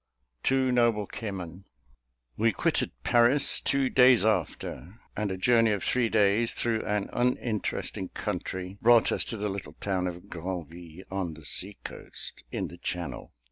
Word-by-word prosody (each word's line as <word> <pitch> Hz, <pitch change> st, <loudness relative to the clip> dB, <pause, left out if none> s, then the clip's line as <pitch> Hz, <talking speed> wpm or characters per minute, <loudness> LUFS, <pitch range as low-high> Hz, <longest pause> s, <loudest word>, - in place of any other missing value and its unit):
Two 130 Hz, -, +2 dB
Noble 115 Hz, -4 st, +3 dB
Kimmen. 95 Hz, -4 st, -6 dB, 0.7 s
We 115 Hz, +2 st, +3 dB
quitted -, -, 0 dB
Paris 120 Hz, +4 st, +4 dB
two 135 Hz, -1 st, +2 dB
days 125 Hz, -3 st, +6 dB
after; 95 Hz, 0 st, -2 dB, 0.2 s
and 105 Hz, 0 st, -1 dB
a 95 Hz, -, -3 dB
journey 115 Hz, +2 st, +4 dB
of 100 Hz, -, -3 dB
three 125 Hz, -3 st, +1 dB
days, 110 Hz, +2 st, +3 dB
through 115 Hz, -2 st, -1 dB
an 105 Hz, -1 st, -1 dB
uninteresting 115 Hz, -6 st, -1 dB
country, 95 Hz, +1 st, -4 dB
brought 120 Hz, 0 st, +5 dB
us -, -, +1 dB
to 115 Hz, -, -3 dB
the 105 Hz, 0 st, -2 dB
little 100 Hz, -1 st, -5 dB
town 95 Hz, -2 st, -2 dB
of 90 Hz, 0 st, -7 dB
Granville, 85 Hz, 0 st, -7 dB
on 95 Hz, -4 st, -3 dB
the 80 Hz, -2 st, -12 dB
sea 100 Hz, +8 st, -4 dB
coast, -, -, -6 dB
in -, -, -2 dB
the 85 Hz, -, -12 dB
channel. 85 Hz, -8 st, -5 dB
105 Hz, 150 wpm, -28 LUFS, 90-115 Hz, 0.7 s, days